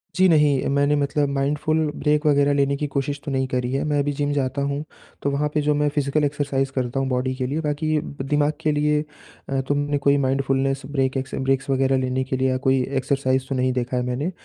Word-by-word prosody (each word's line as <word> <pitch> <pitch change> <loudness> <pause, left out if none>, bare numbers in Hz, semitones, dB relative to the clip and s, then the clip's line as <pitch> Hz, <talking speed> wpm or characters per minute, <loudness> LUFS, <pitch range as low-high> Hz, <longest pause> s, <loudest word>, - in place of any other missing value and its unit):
जी, 185 +1 +5
नहीं 150 -4 +3
मैंने 145 +1 +3
मतलब 145 0 0
माइंडफुल 145 +3 0 0.2
ब्रेक 150 +1 +1
वग़ैरह 145 -1 +4
लेने 140 0 +2
की 150 +1 -2
कोशिश 140 +1 -2
तो 145 - -3
नहीं 130 -1 0
करी 125 -1 -2
है, 135 - 0
मैं 145 -2 +1
भी 145 - -1
जिम 145 +1 -1
जाता 140 0 -1
हूँ, 140 +1 -2 0.4
तो 140 - 0
वहाँ 150 +1 0
पे 150 - +1
जो 150 0 +2
मैं 150 0 +2
फिज़िकल 145 +1 +1
एक्सरसाइज 140 -2 0
करता 130 0 -2
हूँ 135 - 0
बॉडी 130 0 0
के 130 - -2
लिए 145 +4 -2
बाकी 155 +1 0
दिमाग 145 +2 -1
के 155 - +1
लिए 150 0 +1 0.5
अ, 135 -1 0
तुमने 145 0 0
कोई 140 0 +3
माइंडफुलनेस 135 0 0
ब्रेक 135 -1 0
एकस 130 0 -4
ब्रेक्स 135 +1 0
वग़ैरह 135 0 +2
लेने 130 0 0
के 130 0 -3
लिए 130 0 +1
या 130 - +1
कोई 130 0 +2 0.2
एक्सरसाइज़ 130 -1 0
तो 135 - -1
नहीं 130 0 +1
देखा 125 0 -2
है 125 - 0
मैंने, 130 +8 -2
140 Hz, 225 wpm, -23 LUFS, 130-145 Hz, 0.5 s, जी